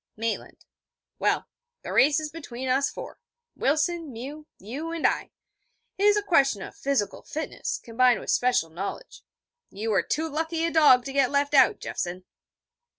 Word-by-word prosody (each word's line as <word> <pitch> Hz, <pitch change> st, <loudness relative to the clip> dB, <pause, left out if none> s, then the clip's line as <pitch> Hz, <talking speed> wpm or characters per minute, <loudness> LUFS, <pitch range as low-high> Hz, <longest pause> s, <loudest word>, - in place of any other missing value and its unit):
Maitland: 225 Hz, 0 st, -4 dB, 0.5 s
'Well, -, -, +1 dB, 0.4 s
the -, -, -5 dB
race 290 Hz, +3 st, +5 dB
is 305 Hz, -1 st, -5 dB
between 260 Hz, -5 st, -7 dB
us 270 Hz, +2 st, +2 dB
four: -, -, -9 dB, 0.4 s
Wilson, 315 Hz, +2 st, 0 dB
Mew, 280 Hz, +6 st, -8 dB
you 275 Hz, -, -6 dB
and 335 Hz, -1 st, -2 dB
I. -, -, +1 dB, 0.7 s
It 400 Hz, -, 0 dB
is 415 Hz, 0 st, +5 dB
a 415 Hz, -, 0 dB
question 275 Hz, -, +2 dB
of -, -, -9 dB
physical 260 Hz, -8 st, -1 dB
fitness 315 Hz, -, -4 dB
combined 245 Hz, +1 st, +2 dB
with -, -, -3 dB
special 245 Hz, -10 st, +2 dB
knowledge. 200 Hz, -, -6 dB, 0.5 s
You 215 Hz, +2 st, -3 dB
are 195 Hz, -, +4 dB
too 320 Hz, +1 st, -2 dB
lucky 320 Hz, +2 st, -2 dB
a 335 Hz, -, -1 dB
dog 290 Hz, -6 st, +6 dB
to 270 Hz, -, -5 dB
get 270 Hz, -2 st, +3 dB
left 285 Hz, 0 st, 0 dB
out, 265 Hz, -3 st, +5 dB
Jeffson.' 180 Hz, +1 st, -4 dB
280 Hz, 160 wpm, -26 LUFS, 240-315 Hz, 0.7 s, dog